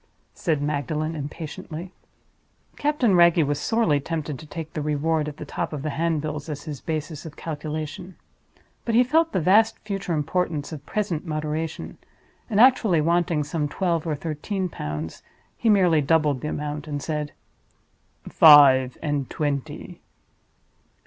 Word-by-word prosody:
said 155 -5 -1
Magdalen, 150 +2 -2
impatiently. 155 +3 -7 0.8
Captain 285 -8 +1
Wragge 170 -2 +5
was 145 0 -1
sorely 225 -11 +2
tempted 150 -2 -4
to 155 - -11
take 160 +1 -7
the 155 - -3
Reward 150 +1 0
at 145 - -11
the - - -7
top - - -4
of 145 -2 -5
the 155 - -2
handbills 155 -1 -2
as 145 -1 -5
his 150 -4 -7
basis 155 -1 -4
of 160 -2 -9
calculation. 155 +3 -6 0.7
But 230 - -1
he 245 - +6
felt 320 +6 +2
the - - 0
vast 210 +7 +4
future 195 -4 -3
importance 155 0 -1
of 150 -3 -7
present 195 -7 -2
moderation; 155 0 -4 0.5
and 210 -2 +1
actually 225 -8 +5
wanting 165 -1 +1
some 150 0 -2
twelve 170 -1 -1
or 155 - 0
thirteen 170 +5 -3
pounds, 75 - -6 0.3
he 230 - 0
merely 180 -7 +4
doubled 150 -3 +2
the - - -3
amount, 150 0 -4
and 145 -1 -3
said, 150 0 -3 1.0
"Five 135 -4 +7
and 145 -3 -1
twenty." 145 -3 -4
155 Hz, 145 wpm, -24 LUFS, 145-175 Hz, 1.0 s, Five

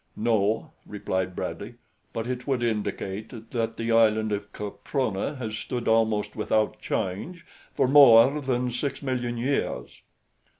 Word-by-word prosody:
"No," 110 -2 0 0.2
replied 95 -3 -3
Bradley; - - -5 0.4
"But 115 - -4
it 125 +1 -4
would 130 -3 0
indicate 110 0 -4
that 115 -1 -2
the 115 0 -2
island 110 -1 +3
of 100 0 -3
Caprona 105 +3 -3
has 110 -4 -4
stood 120 +1 -4
almost 110 -2 +2
without 110 0 0
change 165 - -3 0.3
for - - +3
more 135 0 +7
than 125 -2 -1
six 140 +4 -3
million 125 -3 -2
years." 120 - -2
115 Hz, 130 wpm, -26 LUFS, 105-125 Hz, 0.4 s, more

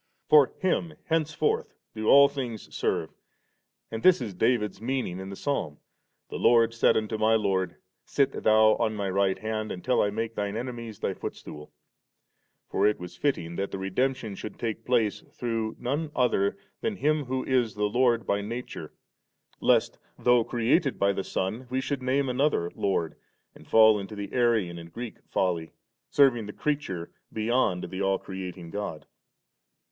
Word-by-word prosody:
For 145 -4 +7
Him 175 -3 0 0.2
henceforth 165 - 0 0.2
do 110 -1 -4
all 140 0 +8
things 130 -6 -6
serve, - - -1 0.8
and 115 - -4
this 185 +5 +6
b 110 -5 -5
David's 105 0 0
meaning 120 -7 -2
in 95 0 -6
the 100 - -6
Psalm, 95 - -2 0.3
* - - -52
The - - -4
Lord 115 -1 +4
said 115 0 +3
unto 110 0 -2
my 110 +1 +4
Lord, 95 -4 0 0.3
Sit 140 -1 +1
Thou 110 0 +5
on 110 - 0
My 100 -2 -2
right 95 0 +2
hand» 110 0 -3
until 110 +8 +1
I 105 - +2
make 115 +2 -3
Thine 105 0 -2
enemies 115 -3 -6
Thy 95 - -2
footstool 75 -4 -8
V - - -38 1.0
For 100 - +3
it 105 - +1
was 90 0 -8
fitting 85 - -1
that 100 0 -1
the - - -5
redemption 110 +4 -1
should 105 +2 -7
take 115 -3 -4
place 115 -4 +1
through 115 -2 -2
none 145 +6 -2
other 100 -6 +2 0.2
than 225 - -1
Him 155 -3 +1
who 130 +1 -2
is 125 -5 +1
the 105 - -2
Lord 120 +2 +2
by 100 0 0
nature, 115 +5 -6 0.7
lest^ - - +2 0.2
though 125 -1 +4
created 125 +6 +1
by 100 0 +2
the 95 - -3
Son, 110 +9 -3
we 130 +1 0
should 135 0 -2
name 135 +2 +1
another 125 - +1
Lord, 90 -5 -1 0.4
and - - -17
fall 110 -1 +6
into 100 +2 -7
the 100 -1 -6
Arian 110 -9 +1
and 85 0 -11
Greek 120 +2 -7
folly, 85 -4 -1 0.4
serving 125 -7 +4
the 105 - -7
creature 140 - -3 0.2
beyond 110 -4 +1
the 95 +1 -4
all 95 0 +2
creating 90 -3 -7
God^ 100 -6 -4
15. - - -36
110 Hz, 170 wpm, -27 LUFS, 100-130 Hz, 1.0 s, all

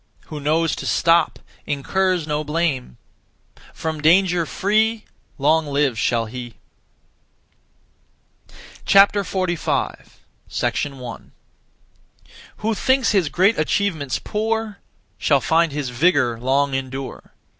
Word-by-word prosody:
Who 150 - -6
knows 155 +3 +1
to - - -5
stop 165 -1 +3 0.3
Incurs 180 +4 0
no 150 0 -2
blame. 150 - -2 0.7
From 160 -2 -4
danger 175 +1 +3
free 220 +2 0 0.3
Long 155 +3 +2
live 140 -3 +1
shall 115 +1 0
he. 120 0 -8 2.3
45. 195 -3 +1 0.3
1. 130 -5 -4 1.3
Who 225 +1 -1
thinks 260 +3 +2
his 190 -8 +2
great 190 +6 +2
achievements 155 -4 0
poor 220 0 -3 0.4
Shall 140 -2 +3
find 165 +4 +2
his 140 -2 -3
vigour 125 -3 +2
long 135 +3 +1
endure. 135 0 -6
155 Hz, 95 wpm, -21 LUFS, 140-190 Hz, 2.3 s, stop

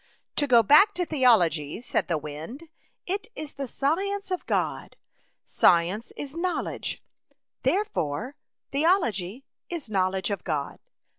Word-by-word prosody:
'' - - -55
To 290 - +3
go 235 -3 +6
back 305 - +6
to 355 0 0
theology,'* 180 - +3
said 245 - -1
the 165 - +1
wind. 155 - -7 0.2
" - - -43
It 390 +2 -3
is 305 -1 -6
the 275 -1 -5
science 385 - -1
of 365 - -3
God. - - -1 0.5
Science 180 +7 +2
is 285 +1 -6
knowledge, 355 +1 -3 0.6
therefore 265 - -1 0.4
the 280 +2 0
ology 240 - +1 0.2
is 315 -10 -5
knowledge 190 0 0
of 200 - -3
God. 150 -4 -3
260 Hz, 140 wpm, -26 LUFS, -, 0.6 s, go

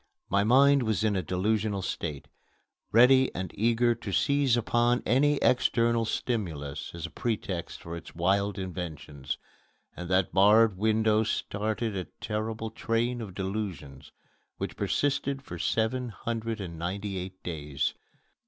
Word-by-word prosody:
My 100 +1 +3
mind 140 +5 +5
was 110 -3 0
in 105 -2 +2
a 95 - +1
delusional 100 +2 0
state, 75 -6 -4 0.6
ready 130 +3 +6
and 95 -2 -4
eager 120 +2 +2
to 115 -3 -7
seize 140 +2 +3
upon 120 +1 +2
any 145 +5 +3
external 115 -2 +3
stimulus 85 - -3
as 85 - -5
a 85 - -7
pretext 100 -5 -3
for 85 0 -6
its 85 - -10
wild 100 +3 +1
inventions, 85 -7 -5 0.6
and 85 -1 -7
that 95 -1 +2
barred 105 +2 +6
window 110 +1 +2
started 110 0 -2
a 90 -2 -3
terrible 110 +1 -3
train 115 +2 -1
of 100 -5 -7
delusions 95 -9 -5 0.5
which - - -4
persisted 140 -1 0
for 85 -9 -8
seven 120 +6 0
hundred 115 +1 -4
and 85 -4 -6
ninety 95 +3 -3
eight 95 +1 -8
days. 75 -5 -2
105 Hz, 135 wpm, -28 LUFS, 90-115 Hz, 0.6 s, ready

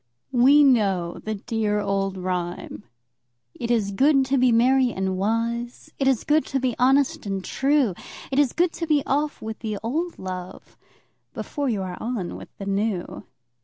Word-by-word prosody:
We 270 +4 +6
know 195 -10 +2
the 215 0 -3
dear 210 -1 -1
old 195 -1 -1
rhyme: 180 - -4 0.7
"It 235 - -5
is 220 -4 +1
good 270 +6 +3
to 270 +1 +1
be 250 -1 +4
merry 250 +2 +4
and 190 -2 -2
wise, 230 +4 -2
It 270 - +1
is 265 -4 +2
good 305 +1 +3
to 270 - -1
be 255 -3 -1
honest 265 -2 +2
and 195 -1 -3
true, 270 -6 +2 0.4
It 270 - +1
is 280 -4 +3
good 345 0 +1
to 330 - -4
be 295 -3 +2
off 290 +2 -1
with 220 0 -5
the 215 -2 -3
old 320 +10 -2
love 185 0 -8 0.6
Before 285 -2 -3
you 205 -5 -1
are 180 -1 -6
on 225 -6 -3
with - - -10
the 195 - -6
new." 200 -2 -2
230 Hz, 170 wpm, -24 LUFS, 195-270 Hz, 0.7 s, We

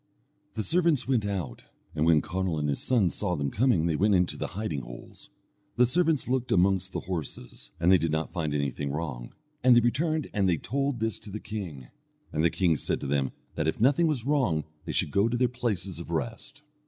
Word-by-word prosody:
The 110 - -2
servants 165 - +2
went 120 -6 +1
out, 90 -12 -4 0.3
and 80 +1 +1
when 80 -2 +5
Conall 95 -3 -2
and 75 -1 -1
his 70 - -1
sons 110 -9 +2
saw 90 -4 -1
them 70 -3 -2
coming 110 -8 +2
they 85 -2 +1
went 100 +5 +3
into 90 -1 +2
the - - -3
hiding 95 -10 -2
holes. - - -11 0.5
The 125 - +5
servants 160 +3 +2
looked 125 0 -1
amongst 95 0 +2
the - - -3
horses, 75 -8 -6
and 85 +2 +4
they 95 - +6
did 85 - 0
not 80 +1 -2
find 80 -5 -2
anything 70 0 -2
wrong; 70 -5 -5 0.3
and 125 -1 +7
they - - +8
returned 155 +6 0
and 100 -3 +2
they 85 - +2
told 140 - -2
this 110 -1 -1
to 105 - -11
the 105 +2 -5
king, 90 - -7 0.4
and 75 - 0
the 85 - +5
king 85 -4 +1
said - - -1
to - - -4
them 70 -1 0 0.2
that 75 - -1
if 80 - -1
nothing 140 +8 +4
was 135 -7 -1
wrong 130 - +1 0.2
they - - -3
should - - +1
go 100 +3 +3
to 120 - -1
their 125 +1 +3
places 100 -8 -2
of 85 - -8
rest. 115 - -4
95 Hz, 215 wpm, -28 LUFS, 80-120 Hz, 0.5 s, they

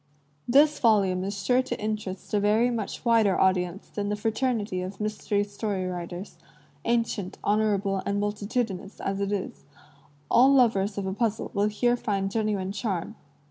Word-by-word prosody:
This 290 +4 +5
volume 195 -6 +3
is 195 0 -4
sure 250 +3 +4
to 260 - -5
interest 210 -3 -4
a 210 - +3
very 215 +4 +3
much 225 +1 -4
wider 225 -4 +4
audience 185 0 +1
than 205 -1 -4
the 210 - 0
fraternity 220 -3 -1
of 190 +2 -6
mystery 210 -1 -1
story 205 -2 -3
writers, 180 +1 -6 0.5
ancient, 230 -5 -1
honor 210 0 +2
able, 195 -1 -1
and 200 0 -1
multitudinous 205 -1 -3
as 195 0 -2
it 200 0 -1
is; 200 -2 -4 0.6
all 260 +3 +6
lovers 220 -7 +3
of 200 - -2
a 190 - -2
puzzle 225 +1 -1
will 205 0 +2
here 240 +3 +1
find 200 -5 -2
genuine 205 -3 -1
charm. 200 -2 -3
205 Hz, 160 wpm, -26 LUFS, 195-225 Hz, 0.6 s, all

